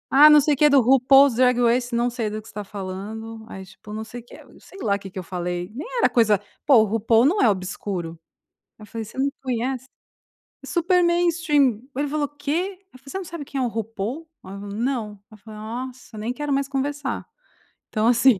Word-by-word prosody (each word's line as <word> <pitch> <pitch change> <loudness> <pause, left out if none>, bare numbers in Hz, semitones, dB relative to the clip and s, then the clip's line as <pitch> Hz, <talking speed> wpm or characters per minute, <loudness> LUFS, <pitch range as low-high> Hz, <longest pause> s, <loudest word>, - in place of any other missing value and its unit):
"Ah 295 +2 +10
não 300 0 +8
sei 300 - +2
o - - -16
que 300 0 +5
do 280 -1 +6
RuPaul's 270 +2 +6
Dragways" 245 0 +3
"Não 240 +1 +1
sei 235 -3 -3
do 215 +1 -4
que 220 - -17
você - - -12
está 210 0 -5
falando", 210 +3 -7
aí 190 0 -8
tipo 195 +2 -14
não 220 +1 -4
sei 240 +2 -9
o - - -25
que, - - -14 0.2
sei 390 - -15
lá 200 -2 +1
o 200 - -5
que 195 - -9
que 190 - -6
eu - - -6
falei, 175 0 -4
nem 280 - -5
era - - +4
coisa 215 -5 +3 0.3
pô 260 -7 +7
RuPaul 225 +2 +3
não 360 +9 +3
é 235 - +5
obscuro, 185 -3 -3 0.6
eu 215 - -11
falei 225 +1 -5
você 215 - -13
não 275 +1 +2
conhece? 255 0 -2 0.8
Super 355 +1 +2
mainstream, 330 - +2 0.2
ele 290 +1 0
falou: 300 0 0
"O - - -24
quê?". 320 +7 -3
Aí - - -50
eu: 255 - -13
"Você 380 - -4
não 380 - -7
sabe 330 -3 -7
quem 275 -1 -3
é - - +1
o - - +1
RuPaul?" 225 +7 -4 0.2
Aí 190 - -9
eu 200 - -8
falei: 205 0 -7
"Não", 245 -2 -1 0.2
ela 215 - -14
falou: 215 +1 -11
"Nossa, 245 +1 -7
nem 220 +3 -3
quero 295 +2 -4
mais 275 0 0
conversar". 280 0 -2 0.7
Então 215 0 +1
assim, 240 -2 +5
240 Hz, 225 wpm, -23 LUFS, 215-280 Hz, 0.8 s, Ah